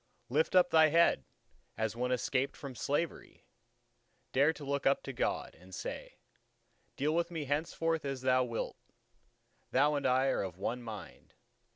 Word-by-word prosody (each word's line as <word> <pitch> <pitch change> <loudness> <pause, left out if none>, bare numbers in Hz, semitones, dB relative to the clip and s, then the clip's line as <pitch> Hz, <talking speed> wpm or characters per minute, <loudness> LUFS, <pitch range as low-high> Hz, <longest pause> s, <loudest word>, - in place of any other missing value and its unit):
Lift 155 +8 +1
up 180 -1 +6
thy 160 -1 +7
head, 165 - +4 0.5
as 110 0 -1
one 125 +1 -1
escaped 130 +2 0
from 140 -2 -7
slavery; 145 +6 -3 0.9
dare 140 +4 +4
to 150 -3 -9
look 140 0 0
up 135 - +3
to 135 - -6
God, - - -1
and 90 +2 -12
say:—"Deal 150 +3 -7
with 170 +1 +1
me 160 -4 -4
henceforth 160 +3 -1
as 135 -2 -3
Thou 130 0 +4
wilt; 115 -2 -4 0.9
Thou 145 +3 +3
and 140 -2 0
I 130 +1 +3
are - - +1
of 90 -3 -5
one 115 +6 -2
mind. 110 -4 -9
135 Hz, 155 wpm, -33 LUFS, 125-155 Hz, 0.9 s, thy